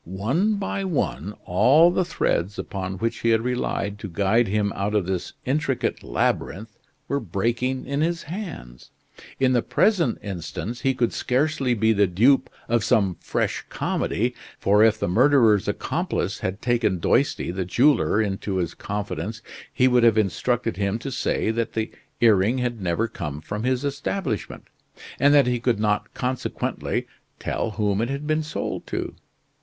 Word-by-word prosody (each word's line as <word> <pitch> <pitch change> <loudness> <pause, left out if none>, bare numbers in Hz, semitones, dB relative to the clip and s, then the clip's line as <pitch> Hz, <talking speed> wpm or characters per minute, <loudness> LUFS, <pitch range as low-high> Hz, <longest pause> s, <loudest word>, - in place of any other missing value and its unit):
One 130 - 0
by 195 -1 -3
one 145 - -2
all 145 - +5
the 185 - +1
threads 100 - -1
upon 95 -1 -4
which 115 +4 -2
he 115 - +1
had 110 -1 +3
relied 115 -4 -2
to 100 - -6
guide 105 +6 +2
him 100 0 0
out 100 +2 -1
of 100 -4 +2
this 95 -1 -3
intricate 140 -1 -1
labyrinth 105 - -2 0.3
were 140 - 0
breaking 120 +6 -1
in 140 +2 -1
his 170 +1 0
hands. 150 - -8 0.5
In 130 -1 +3
the 120 - +3
present 175 - +2
instance 100 +5 -5
he 135 +1 +1
could 120 -2 0
scarcely 130 -1 +1
be 110 +1 +3
the 100 -1 +3
dupe 125 +9 +3 0.2
of 120 -2 +1
some 100 -7 +2
fresh - - -2
comedy, - - -1 0.2
for 105 +2 +4
if 110 -1 +4
the - - -1
murderer's 115 0 +4
accomplice - - -2
had 95 +2 -4
taken 120 -6 +1
Doisty, 85 - +1
the 95 +1 -2
jeweler, 120 +4 +3
into 100 -2 -1
his 85 -3 -1
confidence 105 +2 -5 0.3
he 130 0 +3
would 125 -1 +4
have 115 -2 +5
instructed 110 +2 0
him 100 +1 0
to 135 +3 -6
say 120 -3 0
that 115 0 -2
the 110 -1 -2 0.3
earring 110 +1 +4
had 120 -3 -2
never 90 +5 0
come 75 -9 -5
from 105 +7 -5
his 130 +2 0
establishment, 140 - -3 0.6
and 140 +2 +5
that 140 -3 +6
he 125 -1 0
could 115 -2 0
not 105 0 0
consequently 130 0 -2 0.3
tell - - -2
whom 105 -1 0
it 120 - -1
had 140 +2 -4
been 155 +1 +1
sold 155 0 -4
to. - - -3
115 Hz, 160 wpm, -24 LUFS, 100-130 Hz, 0.6 s, that